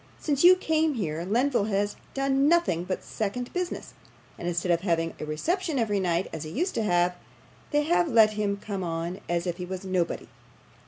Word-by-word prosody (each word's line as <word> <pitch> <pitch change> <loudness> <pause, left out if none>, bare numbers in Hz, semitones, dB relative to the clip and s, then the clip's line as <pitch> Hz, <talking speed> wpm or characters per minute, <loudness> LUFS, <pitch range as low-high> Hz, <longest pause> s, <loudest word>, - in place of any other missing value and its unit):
'Since 290 -1 0
you 360 +1 +9
came 320 -4 +1
here 165 -7 -2
Lenville 235 +1 +1
has 205 0 0 0.2
done 275 +1 +2
nothing 330 - +2
but 185 - -3
second 235 +4 -4
business, 360 -1 -3 0.5
and, 170 - -4
instead 175 +1 0
of 170 -1 +2
having 165 -3 0
a - - -4
reception 320 - -1
every 210 -4 +1
night 180 0 0
as 160 - -4
he 155 - -6
used 345 - -1
to - - 0
have, 175 -3 +2 0.6
they 295 0 +2
have 340 +2 +2
let 225 -6 +5
him 205 -1 -1
come 200 -2 -5
on 170 +2 -3
as 170 0 0
if 175 -1 -2
he 180 - -4
was 185 +1 -6
nobody. 185 -3 -1
200 Hz, 195 wpm, -27 LUFS, 175-275 Hz, 0.6 s, you